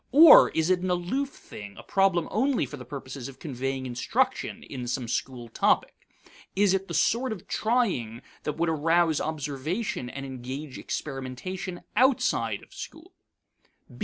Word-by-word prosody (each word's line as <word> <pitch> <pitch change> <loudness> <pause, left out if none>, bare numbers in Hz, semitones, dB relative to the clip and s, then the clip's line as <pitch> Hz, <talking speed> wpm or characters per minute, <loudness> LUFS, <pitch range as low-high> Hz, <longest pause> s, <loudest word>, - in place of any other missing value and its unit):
Or 315 +3 +10
is 160 +2 +1
it 185 - +3
an 185 +1 -2
aloof 180 +11 0
thing, 100 - -11
a - - -10
problem 190 -4 +2
only 260 +4 +2
for - - -8
the 125 -3 -10
purposes 135 -2 -7
of 135 -2 -11
conveying 135 -2 -3
instruction 245 - -1
in 125 -3 -6
some 125 0 -2
school 120 0 -3
topic? - - +2 0.6
Is 200 -1 +4
it 195 0 -1
the 170 - -4
sort 235 - +2
of 205 -5 -7
trying 195 - 0 0.2
that 150 - -2
would 170 +1 +1
arouse 160 0 +2
observation 150 - -3
and 135 +2 -6
engage 130 +2 -6
experimentation 155 +7 -5
outside 255 +2 +2
of - - -18
school? 325 +4 -10
160 Hz, 150 wpm, -27 LUFS, 130-200 Hz, 0.6 s, Or